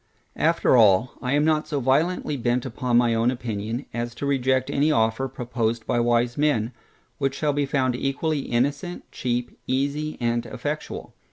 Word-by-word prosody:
After - - +3
all, 110 +1 +5
I 125 +1 -1
am 145 +1 +3
not 155 -1 +2
so 150 -3 -1
violently 150 +5 +1
bent 120 0 0
upon 125 -1 0
my 120 -1 +4
own 115 +1 +2
opinion, 115 0 -3
as 120 0 -3
to 140 - -4
reject 130 -2 +1
any 150 +3 +2
offer, 115 0 +1
proposed 120 -3 -2
by 120 - +1
wise 120 +1 +1
men, 125 -7 +2 0.5
which 135 -1 0
shall 150 0 0
be 145 0 0
found 130 -3 +1
equally 140 +4 -1
innocent, 140 +8 -1
cheap, 120 -1 -3
easy, 145 +4 -1
and 120 -1 0
effectual. 145 +5 -5
130 Hz, 165 wpm, -24 LUFS, 120-145 Hz, 0.5 s, all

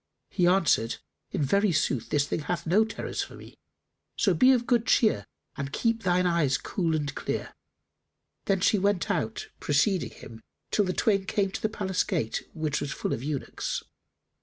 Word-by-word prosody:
He 180 -2 +2
answered, 170 -11 +3 0.3
"In - - -1
very 200 +7 +3
sooth 135 -6 0
this 145 -1 +2
thing - - -2
hath 170 +3 -3
no 190 +7 +4
terrors 220 - -4
for - - -7
me, - - -12 0.6
so - - +3
be 255 +1 +6
of 245 -2 +2
good 240 -2 +2
cheer 215 - +3 0.3
and 140 0 -4
keep 230 - 0
thine 180 -2 +2
eyes 170 -6 +2
cool 170 -5 -1
and 145 -2 -2
clear." - - -4 0.9
Then 195 -2 +1
she 205 +2 +3
went 200 +1 +1
out 145 - -2
preceding 170 +6 +1
him 115 0 -12 0.3
till 205 - +3
the 185 - -1
twain 200 -2 +1
came 195 -2 0
to - - -5
the 215 - +1
palace 190 -4 -1
gate, 110 - -2
which 155 -2 -1
was 140 - -3
full - - -2
of 115 - -3
eunuchs. 140 0 -3
180 Hz, 180 wpm, -27 LUFS, 145-205 Hz, 0.9 s, be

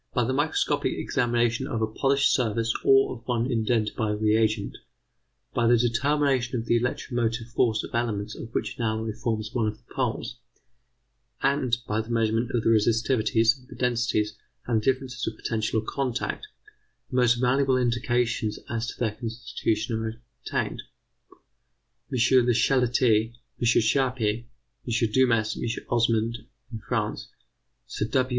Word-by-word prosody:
By 125 - +3
the 130 +3 -1
microscopic 145 +3 0
examination 120 +1 0
of 120 -6 -2
a 110 - +2
polished 135 +5 +2
surface 115 -2 +1
or 135 -1 +5
of 115 -1 -15
one 120 -2 +1
indented 110 -2 0
by 110 - -1
a 105 - 0
reagent, 110 0 +1 0.7
by 120 -1 +2
the 120 +1 +5
determination 130 +1 +1
of 115 - -5
the 120 - +2
electromotive 120 -1 -1
force 115 -2 +1
of - - -9
elements 115 -4 -1
of 115 - -8
which - - -3
an 120 - -3
alloy 110 0 -1
forms 110 -1 -3
one 115 -3 +1
of 105 0 -3
the 120 - -21
poles, - - -2 1.1
and 135 -3 +2
by 110 +1 0
the 110 - -11
measurement 115 0 +1
of 120 -3 0
the - - +2
resistivities, 115 +2 +2
the - - -11
densities, 115 -4 0 0.3
and 115 -3 +1
the - - -11
differences 130 -1 -1
of 110 - -4
potential 110 -1 -1
or - - -14
contact, 135 - -3 0.6
the 130 - -1
most 125 -1 +5
valuable 130 +2 +2
indications 120 -2 0
as 115 0 -3
to - - -7
their 115 -3 +1
constitution 115 0 -3
are 110 +1 -5 0.2
obtained. - - -2 1.3
M. 130 - -1 0.3
Le 120 - +4
Chatelier, 120 -3 +2 0.3
M. - - -4
Charpy, 120 -1 +2
M. 120 -2 -4
Dumas, 115 -3 +2
M. 115 -1 -4
Osmond, 115 -1 +1 0.3
in 110 - -5
France; - - -3 0.6
Sir 105 - -3
W. 130 +2 +1
115 Hz, 150 wpm, -26 LUFS, 110-125 Hz, 1.3 s, or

